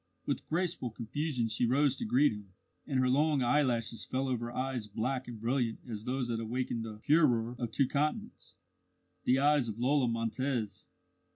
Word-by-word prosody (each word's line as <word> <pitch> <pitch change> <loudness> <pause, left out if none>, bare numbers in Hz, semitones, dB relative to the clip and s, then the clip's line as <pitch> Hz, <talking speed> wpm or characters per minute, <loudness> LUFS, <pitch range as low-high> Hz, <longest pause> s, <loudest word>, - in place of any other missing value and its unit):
With - - -2
graceful 170 -5 -1
confusion 120 +2 -2
she 115 +2 0
rose 135 +2 +3
to - - -3
greet 145 - +4
him, 105 -3 -9 0.3
and 135 -3 0
her 130 - +3
long 145 +1 +3
eyelashes 120 -5 +1
fell 135 +1 -2
over 120 -2 -2
eyes 130 -3 -3
black 125 +5 -2
and 120 -3 -7
brilliant 120 0 0
as 110 -2 -6
those 125 -1 -1
that 115 -1 -1
awakened 115 0 -2
the 110 -1 -7
furore 125 -7 +3
of 120 -2 -2
two 130 +4 +2
continents 150 +3 -2 0.7
the 125 - +4
eyes 145 -2 +3
of 105 - -5
Lola 130 +2 +2
Montez. 115 0 -2
125 Hz, 170 wpm, -32 LUFS, 115-140 Hz, 0.7 s, greet